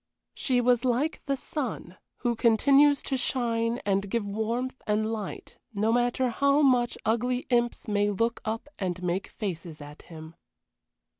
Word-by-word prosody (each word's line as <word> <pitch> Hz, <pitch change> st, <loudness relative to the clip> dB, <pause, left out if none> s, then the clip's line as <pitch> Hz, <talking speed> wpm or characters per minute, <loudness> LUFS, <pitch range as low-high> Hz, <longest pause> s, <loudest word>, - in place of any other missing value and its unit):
She 250 Hz, -2 st, +1 dB
was 245 Hz, 0 st, +3 dB
like 260 Hz, +5 st, 0 dB
the 275 Hz, -1 st, 0 dB
sun, 250 Hz, -, -5 dB, 0.3 s
who 240 Hz, -2 st, +1 dB
continues 275 Hz, +6 st, +4 dB
to 270 Hz, -, -1 dB
shine 235 Hz, -2 st, 0 dB
and 195 Hz, 0 st, 0 dB
give 230 Hz, 0 st, -1 dB
warmth 230 Hz, +6 st, -3 dB
and 210 Hz, +1 st, +1 dB
light 210 Hz, -3 st, -7 dB, 0.2 s
no 215 Hz, +3 st, +2 dB
matter 245 Hz, +1 st, +1 dB
how 280 Hz, +4 st, +3 dB
much 250 Hz, -3 st, +3 dB
ugly 245 Hz, +3 st, 0 dB
imps 240 Hz, -1 st, +1 dB
may 205 Hz, -1 st, +1 dB
look 230 Hz, +4 st, -1 dB
up 225 Hz, +5 st, -3 dB
and 185 Hz, -2 st, -3 dB
make 180 Hz, +2 st, -1 dB
faces 170 Hz, -6 st, -6 dB
at 145 Hz, +1 st, -11 dB
him. 160 Hz, -1 st, -11 dB
230 Hz, 150 wpm, -27 LUFS, 205-250 Hz, 0.3 s, continues